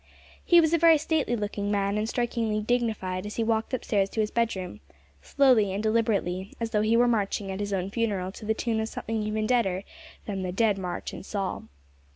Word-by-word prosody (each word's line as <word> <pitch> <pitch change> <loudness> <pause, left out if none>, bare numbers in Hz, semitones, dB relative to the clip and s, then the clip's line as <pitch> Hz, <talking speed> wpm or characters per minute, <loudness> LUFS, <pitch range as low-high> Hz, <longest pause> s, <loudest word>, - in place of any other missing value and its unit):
He 345 - +6
was 320 -1 +3
a 335 - +4
very 330 -1 +7
stately 305 -5 0
looking 205 -2 -3
man, 200 0 0
and 215 +1 -1
strikingly 230 -3 -1
dignified 215 -5 -1
as 210 - -7
he 230 - 0
walked 225 +1 0
upstairs 205 -6 0
to 220 - -5
his 215 -1 +1
bedroom 210 -6 -2 0.4
slowly 250 -8 +3
and 200 +2 -3
deliberately, 210 -4 0
as 230 -1 -3
though 210 - +2
he 220 +2 +3
were 245 +1 +5
marching 205 -3 0
at 190 - -5
his 205 0 -3
own 190 0 -2
funeral 200 -5 -1
to 210 - -10
the 220 +1 +1
tune 225 -1 -1
of 220 0 -2
something 225 -1 -3
even 215 0 -1
deader 200 -6 +1 0.4
than 195 -2 -3
the 185 -1 -3
"Dead 205 0 +2
March 180 -2 -5
in - - -7
Saul." 195 -1 -4
215 Hz, 205 wpm, -27 LUFS, 195-230 Hz, 0.4 s, very